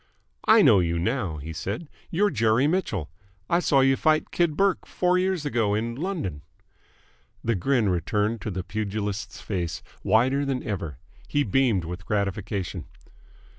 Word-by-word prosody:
"I - - +7
know 100 - +7
you 85 -1 0
now," 95 - -1
he 80 +3 -7
said. 100 - -4 0.2
"You're 205 +4 +2
Jerry 115 +1 +3
Mitchell. 145 - -1 0.4
I 170 - +3
saw 140 -6 +3
you 135 0 +4
fight 155 +2 +1
Kid 170 -3 +1
Burke 195 -1 +1
four 180 0 +2
years 185 -4 0
ago 115 -7 +1
in 115 +2 -2
London." 145 - -3 1.0
The 115 - +1
grin 115 +3 +1
returned 105 +5 0
to - - -3
the 95 -2 -3
pugilist's 105 +1 -4
face, 90 -5 -3 0.2
wider 130 +6 +3
than 135 -2 -2
ever. 85 - -4 0.3
He 145 - +1
beamed 115 -6 +2
with 90 +1 -7
gratification. 100 -2 -2
110 Hz, 150 wpm, -25 LUFS, 95-140 Hz, 1.0 s, I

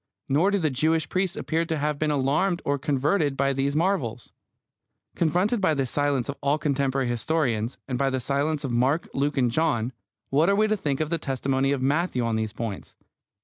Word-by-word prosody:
Nor 155 +8 +3
do 200 - +2
the 160 -6 0
Jewish 155 +4 +1
priests 185 -1 -1
appear 165 +1 0
to 160 -1 -2
have 150 0 -1
been 155 - +1
alarmed 150 +6 +1
or 140 0 0
converted 145 +1 +1
by 140 0 +2
these 140 +1 -1
marvels. 155 - -1 0.8
Confronted 180 +8 +1
by 160 -5 +3
this 135 -3 -1
silence 145 -4 0
of 140 - -4
all 145 +2 +2
contemporary 135 -3 0
historians, 120 -2 -1
and 125 -2 -2
by 135 -1 +2
the 130 0 -1
silence 140 +4 -1
of 135 - -2
Mark, 130 +7 +1
Luke, 145 +2 -1
and 125 -3 +2
John, 130 -5 0 0.4
what 155 +6 +3
are 200 - +4
we 215 +2 +3
to 215 0 +1
think 150 -8 -2
of 155 +1 -2
the 170 - 0
testimony 135 0 0
of 135 -2 -1
Matthew 140 -3 +1
on 115 -1 0
these 110 -1 -1
points? 110 -3 -6
140 Hz, 200 wpm, -25 LUFS, 130-160 Hz, 0.8 s, are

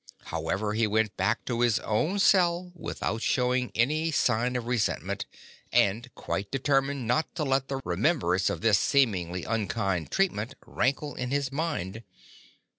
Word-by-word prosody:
However, 105 +2 -1
he 110 0 +2
went 110 0 +1
back - - 0
to 120 -2 -2
his 120 -3 +3
own 155 - 0
cell 180 -3 +3
without 115 -9 -4
showing 125 0 +1
any 155 +8 +2
sign 125 -4 +1
of 120 -2 -2
resentment, 120 -3 -1 0.4
and 105 +4 +2
quite 100 +1 -3
de 135 - -1
termined 135 0 +1
not 125 +7 0
to 155 - -1
let 135 -1 +1
the 135 -1 -3
remembrance 95 - +1
of - - -3
this 110 -2 +4
seemingly 90 - +1
un 115 -3 -1
kind 95 -6 -1
treatment 135 - 0
rankle 140 +3 -1
in 125 -1 -4
his 140 -1 -1
mind. 115 - -3
125 Hz, 155 wpm, -28 LUFS, 105-140 Hz, 0.4 s, this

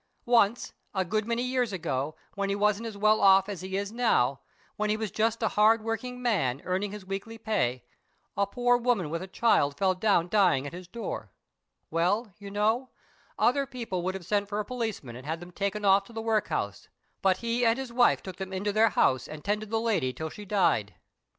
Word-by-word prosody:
Once, 235 -1 +3 0.2
a 190 -1 +1
good 215 +4 -1
many 235 +1 0
years 250 -2 0
ago, 155 -5 -2 0.2
when 200 0 -2
he 200 - +1
wasn't 210 +2 +1
as 215 -3 -7
well 215 +1 +3
off 195 0 +6
as 200 -4 -5
he 190 +1 -3
is 200 +1 -3
now, 140 - +2 0.4
when 215 0 -1
he 215 - +1
was 220 -3 -3
just 225 +2 0
a 220 - +3
hard 215 +1 +4
working 250 +3 -3
man, 175 - 0
earning 190 +2 -1
his 210 -2 -8
weekly 195 +4 -5
pay, 185 - -1 0.5
a 200 0 +1
poor 245 +3 +2
woman 235 -10 0
with 165 +1 -2
a 190 - -6
child 185 -9 +2
fell 190 -1 +2
down 185 -2 +2
dying 180 -9 +3
at 145 - -6
his 180 0 -9
door. 230 +6 -5 0.6
Well, 195 +6 0
you 200 -1 -8
know, 220 +6 0 0.5
other 275 +3 +2
people 235 -9 -4
would 185 +2 -2
have 190 -3 -7
sent 205 +1 0
for 205 0 -2
a 210 - -2
policeman 220 - -4
and 130 +3 -10
had 160 +1 -2
them 175 +1 -11
taken 200 +3 -2
off 195 0 +5
to 235 - -15
the 225 - -4
workhouse, 220 -1 -1 0.3
but 190 -1 +3
he 235 +2 -1
and 230 0 +4
his 265 -3 -6
wife 245 0 +4
took 185 -2 -8
them 190 -1 -6
into 200 +2 -2
their 220 +1 +5
house 130 - +2
and 155 -1 -9
tended 210 +1 -1
the 225 0 0
lady 195 - 0
till 160 +2 -5
she 210 - -9
died." 180 - +1
205 Hz, 215 wpm, -28 LUFS, 185-225 Hz, 0.6 s, off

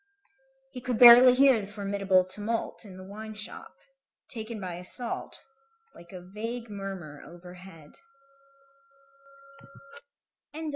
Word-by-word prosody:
He 250 - -9
could 250 -2 -3
barely 245 +1 +9
hear 265 -4 +4
the 200 - -8
formidable 200 -2 0
tumult 210 +5 -5
in 190 -2 -12
the 185 - -11
wine 215 +3 -10
shop, 215 0 -6 0.5
taken 220 -1 -7
by 185 -3 -6
assault, 230 +7 -2 0.5
like 170 - -16
a 185 -2 -10
vague 230 +2 -6
murmur 190 -7 -8
overhead. 180 -2 -14
205 Hz, 105 wpm, -27 LUFS, 185-230 Hz, 0.5 s, barely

